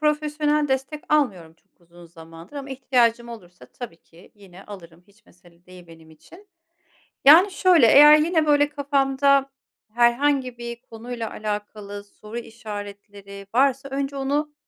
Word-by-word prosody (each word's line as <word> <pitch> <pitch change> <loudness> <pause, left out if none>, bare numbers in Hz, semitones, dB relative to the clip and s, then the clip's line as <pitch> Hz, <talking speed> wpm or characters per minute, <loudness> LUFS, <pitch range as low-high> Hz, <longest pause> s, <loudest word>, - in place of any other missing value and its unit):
profesyonel 300 0 0
destek 270 +3 -3
almıyorum 190 - -1
çok 165 - -42
uzun 175 0 -18
zamandır. 165 - -14
Ama 275 -1 -8
ihtiyacım 240 -3 0
olursa 180 -7 -13
tabii 240 -9 -10
ki 170 +3 -21
yine 195 -2 -16
alırım. 175 -4 -13
Hiç 210 +2 -28
mesele 175 0 -24
değil 180 -1 -15
benim 165 -1 -17
için. 350 - -19 0.8
Yani, 335 +8 +7
şöyle, 365 -7 +4
eğer 295 +5 +8
yine, 320 0 +1
böyle, 290 -1 +3
kafamda 275 -1 +1 0.4
herhangi 250 +1 +1
bir 235 0 -7
konuyla 230 0 -8
alakalı 205 -1 -7
soru 210 +2 -11
işaretleri 205 -3 -10
varsa 270 +1 +1
önce 275 +1 -4
onu 290 +2 -2
235 Hz, 135 wpm, -22 LUFS, 200-285 Hz, 0.8 s, eğer